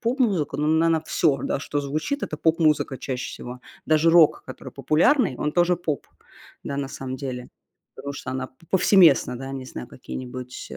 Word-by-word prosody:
поп-музыка, 225 - 0
ну, 150 - -1
она, 160 +1 +3
наверно, 160 -1 +1
всё, 140 -5 +1
да, - - -1
что 145 +1 -3
звучит, 155 - -3
это 155 - -3
поп-музыка 155 -4 +2
чаще 130 -1 -4
всего. 125 +1 -8 0.3
Даже 155 +1 +4
рок, 165 -3 +5
который - - -9
популярный, 175 - +2
он 150 0 -1
тоже 175 0 +3
поп, 155 -6 -3 0.6
да, 140 - -4
на 140 -1 -3
самом 130 -1 -6
деле, 125 -2 -6 0.5
потому 140 - -6
что 130 - -6
она 130 0 -3
п - - -33 0.2
повсеместно, 180 -9 +5
да, 135 +1 -7
не 135 -1 -6
знаю, 125 - -7
какие-нибудь, 125 0 -8
э, - - -7
145 Hz, 185 wpm, -24 LUFS, 130-165 Hz, 0.6 s, рок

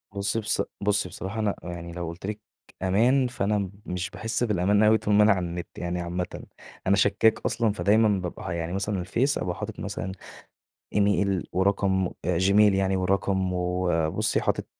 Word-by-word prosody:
بُصّي، 100 +3 0
بص 110 - +1 0.2
بُصّي 100 -2 +1
بصراحة 100 +5 -5
أنا 105 -2 0
يعني 85 -1 -6
لو 85 -1 -4
قُلت 85 +3 -7
لِك 105 +1 -4 0.4
أمان، 120 +8 +3
فأنا 105 -4 -1 0.2
مش 90 0 -3
باحس 115 +2 -2
بالأمان 105 -1 +2
أوي 110 +1 +5
طول 105 - -1
ما 105 +1 +6
أنا 105 - +6
على 90 -2 +1
النت 85 0 -5
يعني 90 0 -3
عامةً. 90 +1 -4 0.4
أنا 100 - +5
شكّاك 105 +3 +3
أصلًا، 115 -2 +1
فدايمًا 105 -1 +3
بابقى 90 -2 -6
ه - - -2
يعني 85 0 -3
مثلًا 100 0 -1
الفيس 120 +11 0
أبقى 90 -1 -2
حاطط - - -6
مثلًا 95 - -4 0.8
إيميل 100 -2 +2
ورقم 95 0 +1 0.2
أ 85 -1 +1
جيميل 100 +2 +5
يعني 95 0 +1
ورقم 95 0 0
وبُصّي 90 +2 0
حاطط - - -1
95 Hz, 170 wpm, -26 LUFS, 90-105 Hz, 0.8 s, ما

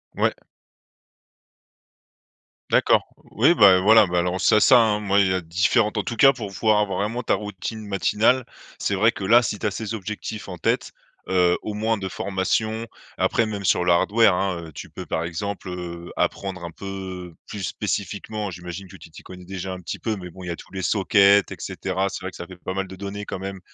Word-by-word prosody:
Ouais. - - +2 2.4
D'accord, - - +4 0.2
oui, 130 - +3
bah, 100 - +7
heu, - - 0
voilà, 110 +1 +6
bah, 90 0 -1
alors, 90 +1 -1
c'est 110 - +5
ça, 125 +3 +7
hein, 110 -2 +2
moi, 100 -1 +2
il 100 - +4
y 95 - +1
a 95 - -1
différentes 100 +6 +1
en - - -1
tout 120 - -4
cas, 135 +4 +6
pour 115 -6 -6
pouvoir 105 +2 +2
avoir 100 -3 -1
vraiment 110 +4 -2
ta - - +1
routine 105 +1 -6
matinale, 105 +5 +2 0.4
c'est 100 - 0
vrai 110 +4 +4
que, 100 - -8
là, 115 +5 +5
si 105 -1 -3
tu 105 - -1
as - - -1
ces 110 +2 -5
objectifs 105 0 -6
en 90 - -6
tête, - - 0 0.4
heu, 90 -2 +3
au 105 - -5
moins 110 +1 0
de 95 -1 -4
formation, 110 +5 -1 0.3
après, 115 - +2
même 100 -2 -5
sur 90 - +3
le 90 - +4
hardware 105 +4 +4
hein, 90 -2 -1
heu, - - -12
tu - - -9
peux - - -8
par 80 - -2
exemple, 95 +3 -5
heu, 90 -1 -7
apprendre 95 -2 -2
un 85 - -6
peu 95 -2 -7
plus 105 - -7
spécifiquement, 105 +3 -3
j'imagine 90 +2 -8
que - - -13
tu - - -14
t'y - - -12
connais 90 -1 -12
déjà 95 0 -5
un 90 - -7
petit 90 - -6
peu, 110 -2 -2
mais 90 -3 -8
bon, 95 +2 -11
il - - -7
y - - -4
a 85 - -2
tous - - -14
les 95 - -4
sockets 100 0 +4
et - - -5
cetera, 95 +1 -2
c'est - - -6
vrai 95 - -4
que - - -15
ça 85 - -7
fait 95 - -12
pas 95 - -5
mal 95 0 -2
de 95 - -9
données 100 +1 -6
quand - - -5
même. 95 0 -6
100 Hz, 225 wpm, -23 LUFS, 90-105 Hz, 2.4 s, bah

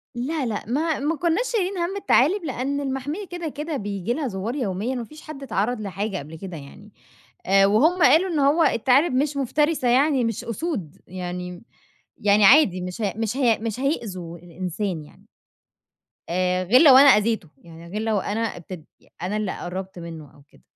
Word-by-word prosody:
لا 270 +4 -2
لأ، 220 -3 -3
ما 305 +6 0
ما 300 +4 0
كناش 340 - 0
شايلين 395 -4 -1
هَمّ 345 +3 -2
التعالب، 370 +1 +3
لأن 275 +1 -2
المحمية 280 +8 -4
كده 350 -2 -5
كده 300 +1 -4
بييجي 200 0 -3
لها 295 +1 -2
زوّار 210 +3 -4
يوميًا، 230 -1 -2
ما 245 - -3
فيش 305 +7 -13
حد 305 -3 -9
اتعرّض 225 -1 -1
لحاجة 200 +1 -3
قبل 155 0 -8
كده 180 -1 -8
يعني، 155 +9 -13 0.5
آآ، 195 +1 +5
وهُم 300 - +3
قالوا 330 +6 +5
إنّه 295 -5 +2
هو 325 +3 +3
التعالب 275 +3 +3
مش 280 +2 0
مفترسة 295 +1 0
يعني، 265 +1 +3
مش 230 0 -2
أُسود 230 - -4
يعني 180 0 -6 0.5
يعني 205 0 +4
عادي 200 - +6
مش 180 +5 -6
ه 200 -3 -1
مش 225 +3 -2
هي 240 -5 +3
مش 225 +1 -4
هيؤذوا 190 - -3
الإنسان 175 0 -5
يعني. 150 - -19 1.0
آآ، 180 +1 0
غير 230 +8 +5
لو 275 -5 +8
أنا 280 - +8
أذيته، 210 - +2
يعني 170 0 -14
غير 210 +4 -4
لو 220 -2 0
أنا 205 +3 -3
ابتد 180 -6 -6 0.2
ي - - -25
أنا 190 +4 -2
اللي 210 -3 -3
قرّبت 185 +1 -6
منه 160 -4 -9
أو 145 - -19
كده، 65 - -24
230 Hz, 180 wpm, -23 LUFS, 185-285 Hz, 1.0 s, لو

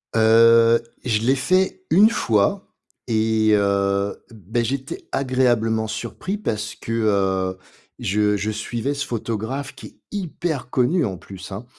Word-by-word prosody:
Heu, 115 +1 +6 0.2
je 110 -4 +1
l'ai 130 +4 +3
fait 185 - 0
1 210 +3 +6
fois 115 - +1 0.4
et 110 -1 +2
heu, 100 0 0
beh, 110 +2 -3
j'étais 135 +3 -4
agréablement 120 -4 +1
surpris 150 - -4
parce 110 - -3
que, - - -8
heu, 95 -4 0 0.4
je 105 +1 +1
je 105 +2 -2
suivais 115 +5 -3
ce 145 - -3
photographe 115 +4 -4
qui - - -11
est - - -19 0.2
hyper 170 -8 -4
connu 140 +6 +2
en 95 -5 -4
plus 95 +2 -11
hein, 105 +5 -7
115 Hz, 135 wpm, -22 LUFS, 105-130 Hz, 0.4 s, Heu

